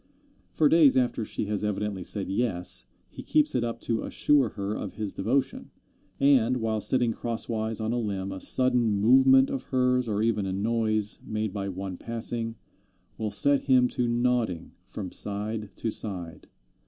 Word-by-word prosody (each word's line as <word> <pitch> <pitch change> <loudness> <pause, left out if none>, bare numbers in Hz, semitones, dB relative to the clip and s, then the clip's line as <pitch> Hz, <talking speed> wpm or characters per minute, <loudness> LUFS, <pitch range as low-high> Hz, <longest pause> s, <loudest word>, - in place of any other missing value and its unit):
For 155 - +3
days 150 -4 +5
after 125 -2 +1
she 105 - -4
has 105 0 -2
evidently 105 -1 -2
said 100 +2 -2
yes, 90 - -1 0.2
he - - -9
keeps 150 0 +2
it 125 - 0
up 115 0 -3
to 115 -1 -1
assure 140 -5 +2
her 100 0 -4
of 105 -2 -5
his 105 -3 -4
devotion, 125 +7 -1 0.5
and, 130 -3 +4
while 110 -2 -1
sitting 120 +1 +2
crosswise 115 -1 -3
on 110 +1 -2
a 120 - 0
limb, 100 -4 -3
a 95 -1 -7
sudden 125 -5 +1
movement 130 +4 +5
of 135 - -4
hers, 125 -1 +1
or 105 0 -1
even 105 -3 0
a 95 - -2
noise 110 0 0
made 110 -2 -3
by 100 -1 -3
one 95 -1 -6
passing, 115 0 -3 0.6
will 110 -1 -1
set 140 +7 +2
him 130 -2 +4
to 125 -2 -1
nodding 120 -7 0 0.2
from 95 -4 -7
side 105 +1 -1
to 115 - -3
side. 90 -7 -3
110 Hz, 165 wpm, -27 LUFS, 105-125 Hz, 0.6 s, days